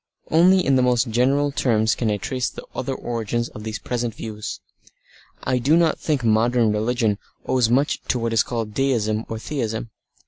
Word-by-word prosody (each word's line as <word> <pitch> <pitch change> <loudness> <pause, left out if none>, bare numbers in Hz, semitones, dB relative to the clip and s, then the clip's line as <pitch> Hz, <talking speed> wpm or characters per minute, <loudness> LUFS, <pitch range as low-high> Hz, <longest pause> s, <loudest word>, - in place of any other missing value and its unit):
Only 180 +3 +5
in 135 -1 +4
the - - +3
most 125 -1 +2
general 135 +5 +2
terms 110 -5 +2
can 115 - -1
I 105 - +1
trace 125 +5 -2
the - - -10
other 135 +1 -3
origins 120 -1 -2
of 105 - -10
these 110 0 -4
present 120 -2 -3
views. 105 -2 -6 0.8
I 130 0 +1
do 145 +7 +3
not 165 -2 +2
think 145 -5 -1
modern 115 +1 +3
religion 110 -1 0 0.3
owes 125 -3 +2
much 135 +4 +1
to - - +1
what 115 -1 -1
is 115 - +4
called 115 -3 -3
Deism 115 -4 0
or 115 - -3
Theism. 115 -3 -4
120 Hz, 180 wpm, -22 LUFS, 110-130 Hz, 0.8 s, Only